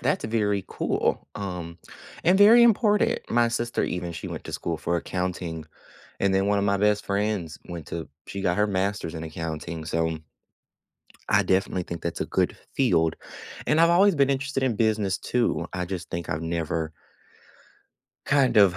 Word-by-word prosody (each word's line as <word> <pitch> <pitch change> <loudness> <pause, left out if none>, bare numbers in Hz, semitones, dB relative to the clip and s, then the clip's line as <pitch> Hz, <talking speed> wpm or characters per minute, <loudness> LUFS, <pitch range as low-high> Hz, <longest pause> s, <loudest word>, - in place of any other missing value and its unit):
That's - - 0
very 105 -3 0
cool, - - -1
um, 90 -4 -5 0.5
and 180 +3 +5
very 215 +4 +8
important. 210 -2 +3
My 120 0 +4
sister, 120 0 -1
even 90 -1 -3
she 85 - -6
went - - -6
to - - -7
school - - -2
for 85 - -1
accounting, 85 -2 -3 0.6
and 100 -1 +2
then 95 0 +2
one 100 0 +2
of - - 0
my 100 0 +2
best 105 +1 +2
friends 100 -5 -1
went 85 -4 -7
to 85 -1 -5 0.2
she 100 - -5
got 90 -1 +1
her 105 0 +3
master's 95 -3 -1
in 80 - -5
accounting, 80 0 -5
so 80 0 -1 1.1
I - - +4
definitely 95 -1 +1
think 85 -1 -7
that's 85 - -3
a - - -1
good - - 0 0.2
field. 85 - +2 0.5
And 155 +2 +3
I've 170 0 +6
always 190 +3 +5
been 140 -2 +3
interested 135 0 -1
in 125 -4 +1
business 105 -3 +1
too, 115 -10 0
I 90 -1 -2
just 90 -2 -6
think 85 -1 -4
I've 80 -1 -2
never 80 -1 -2 1.3
kind 140 -4 +3
of 95 -3 +6
95 Hz, 175 wpm, -25 LUFS, 85-115 Hz, 1.3 s, very